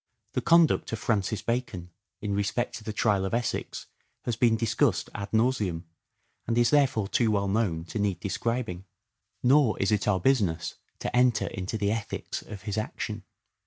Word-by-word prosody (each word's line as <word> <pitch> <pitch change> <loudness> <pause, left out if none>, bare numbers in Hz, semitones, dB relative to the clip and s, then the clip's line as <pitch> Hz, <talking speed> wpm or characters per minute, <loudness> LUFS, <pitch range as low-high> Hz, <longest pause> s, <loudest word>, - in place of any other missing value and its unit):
The - - 0
conduct 170 -1 +4
of - - 0
Francis 105 -2 -1
Bacon 115 -8 -3 0.3
in 105 -1 -2
respect 100 +4 -1
to 110 - -12
the 110 - -4
trial 105 -2 +1
of 95 +4 -1
Essex 120 0 -3 0.4
has 120 - 0
been 115 0 +3
dis 115 -1 -1
cussed - - +1
ad 100 0 -5
nauseam 110 -7 +1 0.6
and 115 0 0
is 120 -1 +4
therefore 135 -8 +3
too 115 +2 +2
well 100 -2 +1
known 95 -6 0
to 105 - -5
need 100 -3 0
describing. 110 -2 -2 0.6
Nor 130 -2 +4
is 100 - +1
it 105 -1 +1
our 95 -3 +3
business 95 -8 +1 0.3
to - - -2
enter 125 -2 +3
into 95 +4 -4
the 100 -1 0
ethics 110 -1 -4
of 100 -3 -10
his 105 +1 -2
action. 105 -1 -5
110 Hz, 175 wpm, -27 LUFS, 100-120 Hz, 0.6 s, conduct